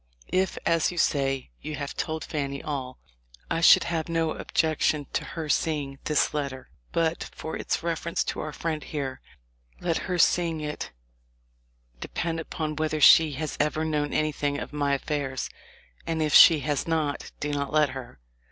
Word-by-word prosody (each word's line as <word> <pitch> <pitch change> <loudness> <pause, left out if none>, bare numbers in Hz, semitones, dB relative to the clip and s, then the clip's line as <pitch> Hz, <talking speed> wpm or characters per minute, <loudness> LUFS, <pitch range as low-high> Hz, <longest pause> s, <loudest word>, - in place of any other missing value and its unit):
If, 185 0 +1
as 165 0 +2
you 175 - -8
say, 135 - +1
you 155 0 -5
have 140 -1 -5
told 160 -1 -3
Fanny 140 -3 -3
all, 130 -4 -4 0.5
I 165 - +1
should - - +8
have 165 -1 -2
no 165 -1 +1
objection 155 -2 0
to - - 0
her 160 -2 -5
seeing 145 -3 -1
this 150 - +2
letter, 140 -3 -4 0.2
but 165 0 0
for 160 - -5
its - - -2
reference 170 0 -1
to - - -4
our 155 - -4
friend 155 -1 -3
here; 135 -4 -4 0.6
let 170 -2 0
her 180 - 0
seeing 170 -1 +3
it 150 0 -4 1.1
depend 165 - -3
upon 155 -1 -4
whether 155 0 0
she 155 +1 +7
has 155 +3 -4
ever 150 +1 +1
known 150 -2 -1
anything 145 -2 0
of - - -6
my 145 -1 +1
affairs; 135 -2 -3 0.6
and 165 -1 -1
if 150 - 0
she 160 -4 +9
has 145 +1 -1
not, 155 -3 -1
do 150 - -2
not 140 -1 -2
let 150 -2 +4
her. 130 - -8
155 Hz, 165 wpm, -26 LUFS, 145-160 Hz, 1.1 s, she